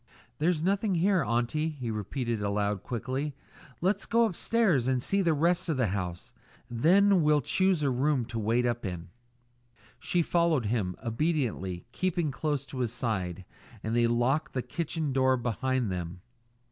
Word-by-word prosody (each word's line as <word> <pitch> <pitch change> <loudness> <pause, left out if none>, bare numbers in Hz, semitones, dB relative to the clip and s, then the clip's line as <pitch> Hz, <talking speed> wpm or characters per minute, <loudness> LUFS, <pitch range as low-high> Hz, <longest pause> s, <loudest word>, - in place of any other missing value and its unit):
"There's 160 0 +1
nothing 195 +1 +1
here, 185 0 +3
aunty," 120 +8 0
he 130 -7 -5
repeated 110 +2 -3
aloud 100 -1 0
quickly. 130 +4 -3 0.5
"Let's 190 +4 0
go 230 0 +4
upstairs 195 - +1
and 130 -1 +2
see 195 +10 0
the 165 -4 +2
rest 170 +3 +1
of 155 - 0
the 125 -6 +1
house. 90 -3 -5 0.4
Then 185 +10 +4
we'll 150 -1 +3
choose 185 +4 +1
a 140 - +2
room 130 0 +1
to 115 0 -5
wait 115 +3 +1
up 120 0 -1
in." 90 -4 -5 0.9
She 175 -1 +1
followed 170 -7 +2
him 100 -5 -1
obediently, 115 - -1
keeping 175 -1 -1
close 145 +2 -2
to 135 -1 -7
his 120 -3 0
side, 95 -7 -2 0.4
and 110 +1 -1
they 120 -1 +4
locked 130 +6 +1
the 130 - -1
kitchen 155 +1 -3
door 130 -1 +3
behind 120 -1 -1
them. 90 0 -5
130 Hz, 160 wpm, -29 LUFS, 115-160 Hz, 0.9 s, go